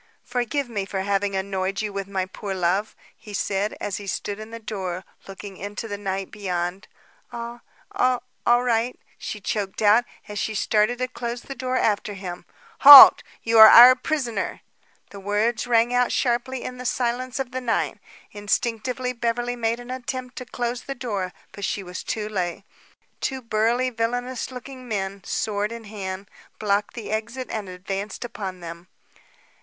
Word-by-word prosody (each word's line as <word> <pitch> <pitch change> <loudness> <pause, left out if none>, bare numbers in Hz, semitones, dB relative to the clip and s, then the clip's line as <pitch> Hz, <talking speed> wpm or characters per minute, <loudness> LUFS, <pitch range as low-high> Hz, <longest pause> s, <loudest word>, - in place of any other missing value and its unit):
"Forgive 250 +3 -1
me 210 -4 -3
for 195 0 -3
having 200 0 0
annoyed 190 0 -2
you 210 -1 -4
with 195 -1 -4
my 190 -2 -2
poor 195 +1 -6
love," 185 +4 0 0.2
he 210 -3 -10
said, 200 +2 -1
as 200 - -3
he 205 - -8
stood 200 +2 -3
in 215 0 -8
the 230 - -7
door, 190 -5 -5 0.2
looking 195 0 -9
into 205 +3 -6
the 205 - -4
night 195 -1 -4
beyond. 185 -2 -3 0.4
"All 235 0 -7 0.3
all 250 -1 +1
right," 240 0 0 0.2
she 210 - -5
choked 200 -1 -3
out 215 +3 +5 0.2
as 205 0 -5
she 220 - -2
started 215 +3 +2
to 255 +1 -1
close 240 -1 -5
the 275 - -7
door 255 -1 -2
after 205 -2 0
him. 180 -2 -7 0.3
"Halt! 285 -1 +12 0.2
You 225 0 +3
are 220 0 +12
our 245 +2 +11
prisoner!" 255 -7 -3 0.5
The 200 - -9
words 215 +4 0
rang 235 0 +3
out 245 -1 +2
sharply 245 +1 0
in 250 0 -6
the 250 - -7
silence 250 +1 -1
of 270 -2 -3
the 260 0 -3
night. 235 -2 -1 0.3
Instinctively, 240 +4 -2
Beverly 240 +1 -1
made 230 0 -1
an 245 +1 -9
attempt 255 0 -5
to 255 - -6
close 245 +1 -3
the 275 - -6
door; 205 -8 -3 0.2
but 200 - -10
she 200 - -2
was 180 0 -7
too 210 -1 -3
late. 185 -3 -3 0.6
Two 265 - -2
burly, 235 +2 0
villainous 245 +2 -2
looking 255 0 -9
men, 195 -3 -3
sword 210 +2 -2
in 230 0 -7
hand, 195 -2 -6 0.3
blocked 205 -1 0
the 225 -4 -6
exit 235 +4 -4
and 210 -4 -4
advanced 195 +5 -5
upon 190 -6 -6
them. 170 +1 -9
220 Hz, 170 wpm, -24 LUFS, 200-245 Hz, 0.6 s, Halt